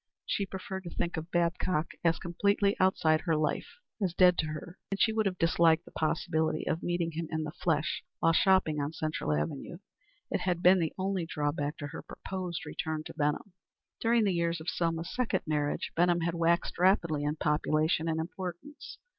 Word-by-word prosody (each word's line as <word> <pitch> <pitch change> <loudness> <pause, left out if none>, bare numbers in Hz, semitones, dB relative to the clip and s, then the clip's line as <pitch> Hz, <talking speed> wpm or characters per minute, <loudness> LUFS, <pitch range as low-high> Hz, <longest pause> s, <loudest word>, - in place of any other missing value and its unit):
She 200 - -1
preferred 190 0 -6
to - - -4
think 175 +1 -2
of 160 +1 -5
Babcock 170 -1 0
as 165 -1 +3
completely 200 +3 +1
outside 160 -4 +3
her 165 -2 +1
life, 155 -1 0 0.3
as 180 -3 0
dead 180 -1 +6
to 155 - +1
her, 155 +4 -7
and 195 - -3
she 220 - +3
would 220 -2 +2
have 185 -1 -2
disliked 165 -1 +3
the - - -14
possibility 155 0 0
of 160 - 0
meeting 175 -1 -1
him 165 +1 -4
in 160 -1 -2
the 150 - -4
flesh 155 -2 -1
while 165 - +3
shopping 175 -5 +3
on 145 +2 -3
Central 155 - -2
avenue. 75 +1 -2 0.5
It - - +1
had 180 -2 -1
been 185 +1 +7
the 160 -2 -1
only 190 -3 -1
drawback 145 -1 -2
to 145 - -5
her 160 - -7
proposed 185 -3 -5
return 155 -1 -3
to - - -9
Benham. 150 +5 -1 0.5
During 230 0 +3
the 200 -3 +2
years 170 -1 0
of 160 +3 -4
Selma's 165 0 -1
second 235 -7 0
marriage 150 -2 -1
Benham 175 0 +3
had 170 0 0
waxed 170 0 +1
rapidly 170 -5 +3
in 150 +1 0
population 155 +2 +1
and 160 0 0
importance. 180 - -6
170 Hz, 190 wpm, -30 LUFS, 155-185 Hz, 0.5 s, been